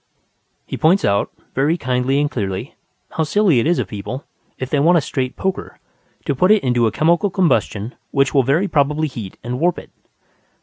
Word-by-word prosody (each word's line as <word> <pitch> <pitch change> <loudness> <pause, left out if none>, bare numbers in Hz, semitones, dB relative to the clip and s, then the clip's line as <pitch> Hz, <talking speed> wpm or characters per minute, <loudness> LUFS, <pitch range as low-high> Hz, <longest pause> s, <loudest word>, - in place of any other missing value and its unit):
He - - -5
points 175 +5 +3
out, 100 0 +1 0.2
very 145 +6 +1
kindly 130 0 0
and 145 0 0
clearly, 100 - -4 0.4
how 160 - -1
silly 175 - +3
it 115 - +1
is 175 - +2
of - - -1
people, 120 +6 -6 0.3
if 130 0 -5
they 145 - +2
want 170 +5 +5
a - - +5
straight 130 -3 -3
poker, 190 0 -3 0.5
to - - 0
put 180 +8 +2
it 215 0 +5
into 120 -3 +2
a - - 0
chemical 170 - +2
combustion 130 - 0 0.2
which 135 -1 +1
will 140 - +5
very 145 +10 +1
probably 150 -1 +1
heat 115 -9 -8
and 125 +2 -4
warp 175 +2 +2
it. - - -10
140 Hz, 190 wpm, -19 LUFS, 125-170 Hz, 0.5 s, want